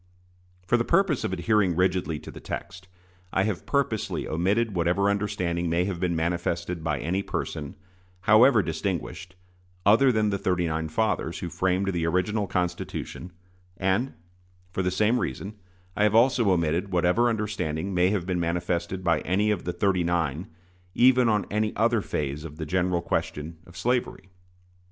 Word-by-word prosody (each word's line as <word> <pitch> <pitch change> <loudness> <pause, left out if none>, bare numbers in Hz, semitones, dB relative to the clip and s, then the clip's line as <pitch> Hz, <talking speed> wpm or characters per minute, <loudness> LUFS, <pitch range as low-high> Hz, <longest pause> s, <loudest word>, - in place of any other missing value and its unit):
For 120 - +3
the 120 - +1
purpose 180 -1 +2
of - - -1
adhering 95 0 +2
rigidly 90 -3 +1
to - - -9
the - - -10
text, 95 -1 -7 0.4
I 95 - +2
have 100 -3 -3
purposely 135 -7 -1
omitted 100 +7 +1
whatever 90 +3 +2
understanding 90 -4 -1
may 85 +2 +1
have 95 -3 -3
been 85 -1 0
manifested 85 0 -2
by 75 -2 0
any 90 +5 -1
person, 75 -6 -4 0.5
however 110 +4 +6
distinguished, 85 +2 -4 0.5
other 115 +6 +6
than 110 -2 +1
the 100 - -1
thirty 90 -2 0
nine 80 -1 -2
fathers, 85 -1 -1
who 90 - -5
framed 95 +2 0
the 85 -1 0
original 95 +4 0
Constitution; 90 0 -3 0.5
and, 95 +8 0 0.6
for 95 - -1
the 90 - +1
same 105 +6 +2
reason, 100 - -4 0.4
I - - -1
have 105 0 +3
also 120 -2 +4
omitted 85 +2 +1
whatever 90 +7 +3
understanding 100 -6 -2
may 90 0 +3
have 95 -4 -1
been 90 -1 -1
manifested 85 +2 -2
by 85 -3 +2
any 100 +6 +1
of 100 -5 -2
the 90 - -2
"thirty 90 0 +1
nine" 85 -1 -1 0.5
even 125 -1 +5
on 105 -2 +1
any 105 +1 0
other 115 0 +2
phase 75 -4 -3
of 75 -2 -9
the 80 - -4
general 90 +1 0
question 80 0 -3
of 85 +1 -13
slavery. 120 -1 -1
90 Hz, 160 wpm, -26 LUFS, 85-105 Hz, 0.6 s, however